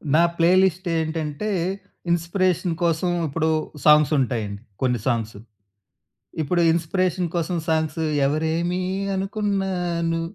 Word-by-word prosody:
నా 165 - +6
play 170 0 +3
list 190 0 +1
ఏంటంటే 160 +4 -2 0.6
inspiration 175 0 +1
కోసం 170 +1 +1 0.2
ఇప్పుడు 160 +2 0 0.4
సాంగ్స్ 150 -1 +6
ఉంటాయండి. 110 -6 -2 0.2
కొన్ని 125 -2 +1
సాంగ్స్. 115 -4 -1 1.1
ఇప్పుడు 175 +3 +1
ఇన్‌స్పిరే‌షన్ 175 +1 0
కోసం 175 +1 -1
సాంగ్సు, 160 0 0 0.2
ఎవరేమి 160 +5 0 0.3
అనుకున్నా 195 0 -1 0.4
ను 165 0 0
165 Hz, 105 wpm, -23 LUFS, 150-180 Hz, 1.1 s, నా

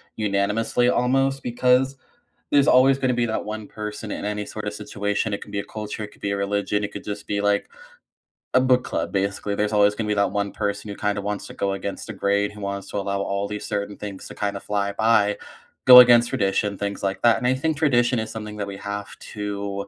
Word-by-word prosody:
unanimously 105 +4 +1
almost 135 +2 +1
because 125 +2 +2 0.5
there's 140 -1 +4
always 130 +1 +6
gonna 130 -2 +1
be 120 0 +1
that 110 - -2
one 105 0 -6
person 105 0 -6
in - - -4
any, 105 0 -2
sort 110 0 -7
of, 105 - -3
situation, 105 0 -2
it 100 - -3
could 105 - -10
be 100 - -2
a - - -3
culture, 105 0 -6
it 105 - -6
could - - -21
be 100 - -1
a 100 - -1
religion, 100 +1 -1
it 105 - -3
could, - - -8
just, 105 0 -6
be, 100 -1 -1
like, 100 0 +1 0.9
a 130 - +5
book 130 -1 +3
club, - - -3
basically. 100 +1 -1
There's 105 +1 -1
always 105 0 +4
gonna 110 0 -3
be 105 - +1
that 100 -1 +1
one 100 -1 -1
person 100 0 -3
who, 100 - -5
kind 105 0 -1
of, 100 - -3
wants 105 -1 -3
to - - -10
go 100 0 -1
against 100 0 -5
the 110 - -6
grain, 100 +1 0
who 105 0 -11
wants 100 0 -4
to - - -3
allow 100 0 -1
all 100 0 -2
these 105 0 -5
certain 100 0 -3
things 100 -2 -7
to, - - -10
kind 100 -1 -2
of, 100 - -7
fly 100 -1 -1
by, 105 -1 +3 0.5
go 125 -1 +12
against 120 -1 +7
tradition, 100 0 0
things 100 0 -4
like 95 0 -2
that, 120 -1 +5
and - - -4
I 130 - +4
think 155 +4 -1
tradition 125 -4 +2
is 110 - -4
something 105 -1 -7
that 100 -1 -3
we 100 -1 -6
have 100 0 -6 0.2
to 100 -1 -4
105 Hz, 240 wpm, -23 LUFS, 100-115 Hz, 0.9 s, go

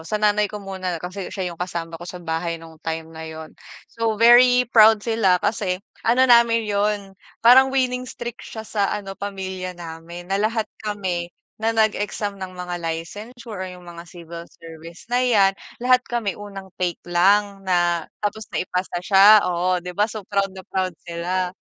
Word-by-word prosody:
sa 165 +6 -3
nanay 210 -1 +2
ko 210 - -7
muna 185 -2 -4
kasi 185 +3 -6
siya 185 -3 -4
yung 170 - -15
kasama 170 -2 -4
ko 175 - -8
sa 180 - -7
bahay 165 +1 -2
nung 160 -1 -14
time 160 0 -5
na 160 - -9
yun. 160 0 -9 0.4
So 225 -2 -1
very 245 +2 +7
proud 220 -2 +6
sila 225 -6 +3
kasi 190 -4 0 0.3
ano 255 +3 +5
namin 235 -2 +5
yun 205 -1 -1 0.3
parang 260 +3 +8
winning 255 -1 -1
streak 240 -2 -7
siya 220 -1 -8
sa 205 -2 0
ano 195 -2 -6
pamilya 190 -2 -5
namin 170 +1 -9
na 195 - +1
lahat 220 +1 0 0.2
kami 190 -5 -3 0.3
na 225 +1 +1
nag-exam 210 -2 0
ng 185 - -5
mga 180 0 -5
licensure 205 +7 -6
o - - -3
yung 180 - -16
mga 170 -1 -9
civil 170 -1 -9
service 165 +2 -12
na 250 +1 +3
yan, 205 -6 +4 0.3
lahat 255 0 +5
kami 235 -5 -1
unang 200 -2 -9
take 175 -2 -1
lang 195 +3 +2
na 175 -2 +1 0.2
tapos 215 +1 -2
naipasa 180 0 -2
siya, 200 +3 +7
oo 180 +1 +1
di 180 - -5
ba? 210 +3 +2
So 215 -2 -7
proud 200 -1 0
na 190 - -9
proud 185 -2 -2
sila 180 +2 -2
195 Hz, 175 wpm, -22 LUFS, 175-215 Hz, 0.4 s, parang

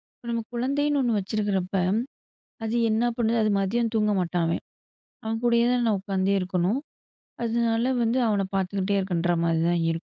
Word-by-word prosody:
இப்ப, - - -21
நம்ம 230 0 -1
குழந்தைன்னு 280 +4 +1
ஒண்ணு 235 -4 +1
வச்சிருக்கிறப்ப, 195 -2 -2 0.9
அது 225 +2 -1
என்ன 220 +2 +1
பண்ணுது? 235 -1 +1
அது 215 - +2
மதியம் 230 +4 0
தூங்க 210 -1 +2
மாட்டான், 175 -1 0
அவன். 165 - -1 0.6
அவன் 225 0 -2
கூடயே 235 -1 +4
தான், 245 -1 +1
நான் 210 -3 +2
உட்காந்தே 195 0 0
இருக்கணும். 185 +6 0 0.6
அதனால 230 +1 +1
வந்து 230 +3 +1
அவன 200 -2 +1
பார்த்துக்கிட்டே 195 +1 0
இருக்கேன்ற 175 -2 0
மாரிதான் 170 +1 +1
இருக்கும். 165 +1 -4
210 Hz, 155 wpm, -25 LUFS, 185-235 Hz, 0.9 s, கூடயே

